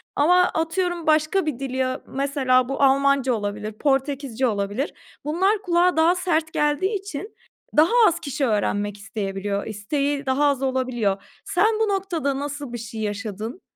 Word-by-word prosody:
Ama 320 +5 +4
atıyorum 345 0 -1
başka 310 +4 +3
bir 295 -6 -3
dili 265 -1 -4
ya, 260 +1 -1
mesela 265 -2 +1
bu 275 +1 0
Almanca 275 -1 +3
olabilir, 210 0 -3
Portekizce 270 0 0
olabilir. 205 +5 -2 0.3
Bunlar 380 +7 +1
kulağa 355 -2 +2
daha 330 +3 +4
sert 330 -3 0
geldiği 295 +8 +1
için 395 +2 -7 0.4
daha 315 +5 +6 0.2
az 340 - +1
kişi 280 -1 -2
öğrenmek 205 -2 0
isteyebiliyor. 200 -1 -3
İsteği 280 +7 -2
daha 265 +2 +2
az 280 -2 +2
olabiliyor. 245 -7 -1 0.2
Sen 415 +3 +2
bu 445 - +2
noktada 335 -8 -1
nasıl 285 -2 -5
bir - - -3
şey 225 -1 -7
yaşadın 215 - -4
275 Hz, 150 wpm, -23 LUFS, 230-320 Hz, 0.4 s, daha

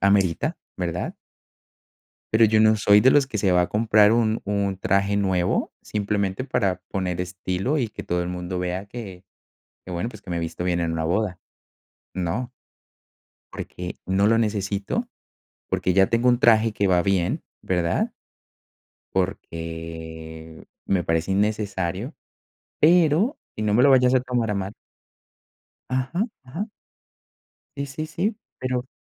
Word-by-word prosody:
amerita, 100 - +2 0.2
¿verdad? - - -3 1.2
Pero 115 +1 +6
yo 110 0 +4
no 110 0 +5
soy 105 0 +5
de 130 +4 +6
los 140 -2 +4
que 110 -5 -4
se 95 -2 +2
va 90 0 +4
a - - -1
comprar 105 -1 +4
un 115 -1 +2
un 100 -1 0
traje 100 +2 +1
nuevo 95 -3 +1
simplemente 100 +1 -1
para 95 -8 0
poner 90 -2 -2
estilo 95 - -2
y 120 -4 0
que - - -8
todo 90 0 -1
el 85 - -4
mundo 90 0 -4
vea 90 +2 -2
que 100 -5 -8 0.6
que - - -9
bueno, 90 +7 -2
pues 110 -4 -11
que 90 - -10
me 85 - -1
visto 85 +1 -4
bien 90 -1 +1
en 85 -1 0
una 80 -1 -1
boda, 90 +1 0 0.8
¿no? 95 +8 -2 1.0
Porque, 90 0 -6
no 95 +2 +2
lo 115 +1 +4
necesito, 100 -2 -1 0.6
porque 90 - +1
ya 95 0 +5
tengo 120 +2 +3
un 120 - +3
traje 115 -2 +5
que 100 -1 0
va 90 -1 +4
bien, 95 -3 0 0.2
¿verdad? 90 -2 0 1.0
Porque 80 -3 -5 0.2
me 95 -3 +1
parece 80 +3 0
innecesario, 100 - -1 0.7
pero 170 - +4 0.2
y 110 - -3
no 105 -1 +1
me 120 - +5
lo 140 - +6
vayas 125 -1 +5
a 130 - +5
tomar 125 -3 -1
a 105 - 0
mal 100 +1 -3 1.1
Ajá, 130 - 0 0.2
ajá. 165 - -5 1.1
Sí, 140 - -3
sí, 150 +3 -5
sí, 205 +7 -1 0.2
pero 130 0 -2
100 Hz, 150 wpm, -24 LUFS, 90-115 Hz, 1.2 s, Pero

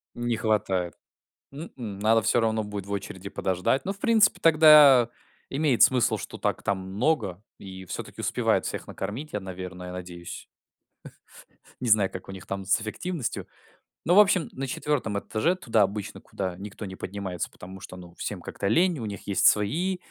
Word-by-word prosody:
Не 120 -1 -1
хватает. 95 -6 0 0.6
М-м, 125 - -8
надо 110 +2 +4
всё 120 - +2
равно 110 -1 +1
будет 105 -2 -6
в 100 - -9
очереди 100 -1 -5
подождать, 95 +9 0
но 195 - -1
в 200 - -18
принципе 225 -3 +4
тогда 150 -6 +7 0.4
имеет 140 -3 +1
смысл, 125 -2 +4
что - - -8
так - - -1
там 100 - 0
много, 100 - -1 0.2
и 95 -1 -10
всё-таки - - -7
успевают - - +1
всех - - -4
накормить, 120 +11 -6
я, 105 - -1
наверное, 90 -1 -7
надеюсь. 90 -1 -8 1.4
Не 125 - -1
знаю, 105 -3 +4
как 95 - -9
у - - -5
них 95 -1 -9
там 95 0 -4
с 95 +3 +2
эффективностью. 120 - -4 0.6
Ну, 175 - +3
в - - +8
общем, 190 -4 +4
на 135 +1 -5
4 130 -6 -1
этаже, 140 - 0
туда 115 - +1
обычно, 100 0 -2
куда 95 -2 -4
никто 100 +2 -8
не 95 -1 -7
поднимается, 95 -3 -5
потому 95 +1 -11
что, 90 - -10
ну, 90 -1 -12
всем - - -5
как-то 100 - -4
лень, 170 - +3
у 115 - -4
них 100 -1 -7
есть 100 - +3
свои 165 - +2
105 Hz, 175 wpm, -26 LUFS, 95-135 Hz, 1.4 s, в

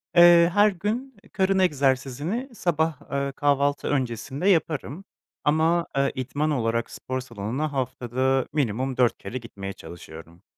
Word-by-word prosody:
Eee, 175 -1 +8
her 205 +1 +5
gün 220 +8 -3 0.2
karın 190 0 +2
egzersizini 145 - 0
sabah, 160 -4 0
ııı, 140 0 -1
kahvaltı 145 0 +1
öncesinde 135 - -1
yaparım, 160 0 0 0.4
ama, 160 +3 +2
eee, 140 0 +2
idman 145 +4 -1
olarak 115 -4 -1
spor 130 0 -4
salonuna 125 +5 -4
haftada 130 0 0
minimum 130 -2 -1
4 125 -2 +3
kere 125 - -6
gitmeye 100 -5 -7
çalışıyorum. 85 0 -12
140 Hz, 125 wpm, -25 LUFS, 125-170 Hz, 0.4 s, Eee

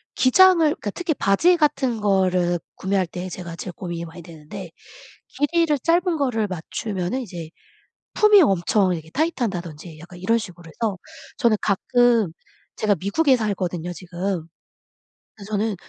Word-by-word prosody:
기장을 370 +8 +6
그러니까 300 -9 +1
특히 330 - -2
바지 335 - +3
같은 270 -7 +1
거를 185 -3 +2 0.2
구매할 190 -1 0
때 180 +2 -6
제가 175 -1 -7
제일 180 - -6
고민이 170 -2 -5
많이 170 +1 -11
되는데. 170 +3 -10 0.7
길이를 305 0 +2
짧은 345 +4 +2
거를 240 -7 0
맞추면은 190 +5 -4
이제 175 -8 -8 0.7
품이 425 -3 +6
엄청 190 - +2
이렇게 160 -1 -8
타이트하다든지 180 - -3
약간 175 +2 -12
이런 230 +5 +2
식으로 175 -5 -9
해서 205 +2 -3 0.4
저는 235 -5 +3
가끔 230 -1 +2 0.4
제가 210 -2 +2
미국에 265 - +3
살거든요 180 -6 -2
지금. 180 -1 -4 0.9
그 200 -2 -12
저는 210 0 -1
200 Hz, 320 characters per minute, -22 LUFS, 175-255 Hz, 0.9 s, 기장을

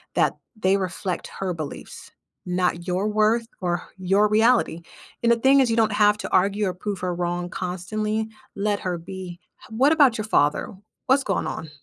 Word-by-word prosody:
that - - +2 0.2
they 195 -2 +2
reflect 185 -1 -3
her 185 -2 -1
beliefs, 155 -3 -8 0.3
not 180 -1 -1
your 185 +3 0
worth 215 +2 +2
or 175 -1 -1
h - - -29
your 205 +2 +4
reality, 220 -5 +3 0.4
and, 235 - +4
the 235 - +4
thing 265 +4 +5
is, 260 -3 +3
you 225 - +1
don't 220 -1 +3
have 210 0 +4
to - - -5
argue 200 +3 +2
or 185 - -2
prove 195 +2 -5
her 180 -1 -2
wrong 175 0 -2
constantly, 210 +5 -3 0.3
let 205 0 0
her 180 -2 -2
be, 175 0 -8 0.2
h - - -12
what 255 +7 +3
about 285 -7 +5
your 215 - -3
father? 145 -9 +1 0.3
What's 270 +1 +4
going 195 - -1
on? 160 - -5
200 Hz, 190 wpm, -24 LUFS, 180-220 Hz, 0.4 s, thing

